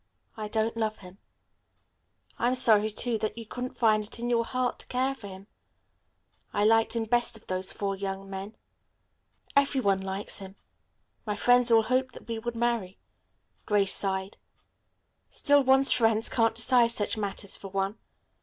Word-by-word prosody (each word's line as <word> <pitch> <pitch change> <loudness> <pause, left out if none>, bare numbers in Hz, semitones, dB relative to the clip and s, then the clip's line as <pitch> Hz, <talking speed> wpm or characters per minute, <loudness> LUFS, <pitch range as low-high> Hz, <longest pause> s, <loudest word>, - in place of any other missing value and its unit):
I 215 -1 -5
don't 220 +1 -1
love 220 -1 -2
him." 185 +1 -14 1.2
"I'm 245 +2 +1
sorry, 215 -4 +4
too, 225 +1 0
that 215 +2 -3
you 230 - -7
couldn't 250 +3 -6
find 215 -2 +3
it 210 - -9
in 240 +1 -3
your 230 -1 +2
heart 255 0 -2
to - - -10
care 260 +2 0
for 230 -7 -11
him. 190 0 -11 1.1
I 205 - 0
liked 225 +1 +3
him 230 - 0
best 240 0 +1
of - - -18
those 185 0 -1
four 200 -1 -3
young 195 0 -5
men." 195 +2 -7 1.0
"Every 280 -1 +3
one 195 -5 +1
likes 190 +1 -5
him. 195 0 -10 0.7
My 210 -2 -3
friends 245 +3 +4
all 225 -1 +5
hoped 255 +2 0
that - - -13
we 230 -1 -4
would 240 +1 -5
marry." 230 -5 -1 0.7
Grace 200 -2 +2
sighed. 190 0 -2 0.9
"Still 285 -1 +3
one's 265 +1 +5
friends 225 -2 +3
can't 225 -2 +1
decide 235 +1 +4
such 220 -2 -1
matters 200 -1 -1
for 195 - -8
one. 195 +2 -3
220 Hz, 165 wpm, -28 LUFS, 200-240 Hz, 1.2 s, all